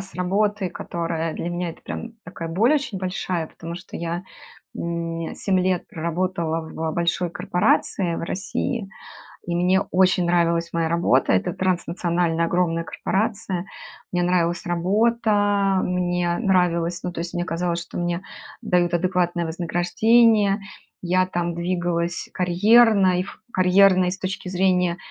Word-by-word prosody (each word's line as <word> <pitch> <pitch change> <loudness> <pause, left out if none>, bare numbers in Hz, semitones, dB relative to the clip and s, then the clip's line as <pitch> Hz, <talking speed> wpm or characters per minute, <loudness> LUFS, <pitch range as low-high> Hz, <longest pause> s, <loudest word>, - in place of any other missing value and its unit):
с 195 0 -11
работы, 195 +1 0
которая 165 -2 -3
для 175 - -4
меня 175 0 -2
это 165 - -14
прям 230 0 -6
такая 165 -2 -7
боль 220 - +3
очень 280 -9 -1
большая, 180 -2 -2
потому 165 +1 -8
что 180 - -9
я, 170 +1 -3 0.5
м, 165 -1 -3
7 190 -2 0
лет 185 -1 0
проработала 170 0 -2
в 160 0 -4
большой 170 +1 0
корпорации 180 +1 0
в - - -4
России, 195 +4 -3 0.6
и 170 - -2
мне 180 +2 +3
очень 185 -1 +3
нравилась 170 -1 +1
моя 165 -1 0
работа. 165 - +2
Это 95 - +1
транснациональная 175 -2 0
огромная 165 -1 0
корпорация. 200 -3 -2 0.5
Мне 175 0 +1
нравилась 175 0 +1
работа, 205 +1 +2
мне 180 -1 0
нравилось 175 -4 +1
ну, 180 - -4
то - - -8
есть, 170 +1 -5
мне 175 - -1
казалось, 170 0 -2
что 170 - -8
мне 175 +1 -1 0.4
дают 180 -5 +1
адекватное 175 -1 0
вознаграждение. 200 +6 +3 0.4
Я 185 +1 +2
там 175 -2 -2
двигалась 175 0 -2
карьерно, 195 +1 +4
и - - +1
ф 195 - -11
карьерно, 185 0 +5
и 180 - +1
с 195 - -5
точки 190 -1 -4
зрения 180 -1 +1
180 Hz, 140 wpm, -23 LUFS, 170-190 Hz, 0.6 s, карьерно